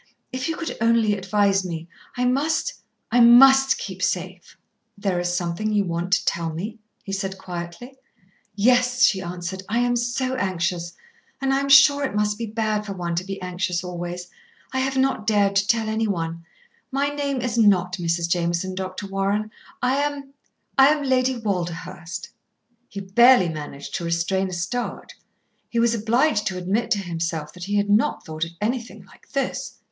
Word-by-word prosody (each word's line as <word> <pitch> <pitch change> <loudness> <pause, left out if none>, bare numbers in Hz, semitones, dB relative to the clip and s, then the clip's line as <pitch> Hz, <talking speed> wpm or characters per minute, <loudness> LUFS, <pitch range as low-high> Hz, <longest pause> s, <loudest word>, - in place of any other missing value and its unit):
"If 255 +3 -3
you 325 - -1
could 325 - -4
only 230 -2 +3
advise 195 0 +1
me; 165 -2 -5 0.3
I 250 - +1
must 305 - 0 0.3
I 245 - +4
must 270 +3 +7
keep 190 -1 -7
safe." 185 0 -3 0.4
"There 195 -3 -1
is 175 0 -1
something 175 +4 -2
you 205 -1 +2
want 170 +1 -3
to - - +2
tell 170 -1 0
me?" 205 +8 -6 0.2
he 195 - -7
said 195 0 -3
quietly. 180 +9 -8 0.6
"Yes," 245 +3 +3
she 195 -5 +4
answered. 180 +1 -5
"I 230 - 0
am 245 0 +2
so 240 +2 -1
anxious, 175 -6 -2 0.5
and 270 0 0
I 270 - +2
am 275 0 -2
sure 280 +1 +7
it 265 - -2
must 210 0 0
be 230 - -3
bad 215 -1 -1
for 200 -2 -5
one 175 -2 -3
to 170 +2 -1
be 195 +1 -6
anxious 180 0 -2
always. 175 0 -5 0.5
I 260 - 0
have 265 0 -1
not 265 -5 +1
dared 200 -2 +3
to 200 0 +2
tell 225 -2 +2
anyone. 175 -7 -2 0.5
My 280 +2 +1
name 285 -2 -2
is 245 -2 -2
not 190 -5 +3
Mrs. 170 -1 -1
Jameson, 170 +2 -1
Dr. 185 +1 -5
Warren. 200 +2 -1 0.3
I 255 +2 +2
am 285 -1 -3 0.5
I 270 - +9
am 295 0 +2
Lady 260 -1 +2
Walderhurst." 180 -4 -4 0.6
He 200 - -6
barely 205 0 +5
managed 145 -3 -7
to - - -3
restrain 170 +3 0
a - - -7
start. 185 +9 -4 0.6
He 235 - -4
was 230 0 +3
obliged 230 +1 +1
to 190 -3 -2
admit 195 +6 -1
to 210 - +2
himself 165 -4 -3
that 180 -1 -8
he 205 +1 -2
had 205 0 +1
not 215 +2 +2
thought 155 +1 -3
of 165 - -10
anything 220 -3 -3
like - - -21
this. 275 -2 -3
200 Hz, 175 wpm, -23 LUFS, 180-245 Hz, 0.6 s, I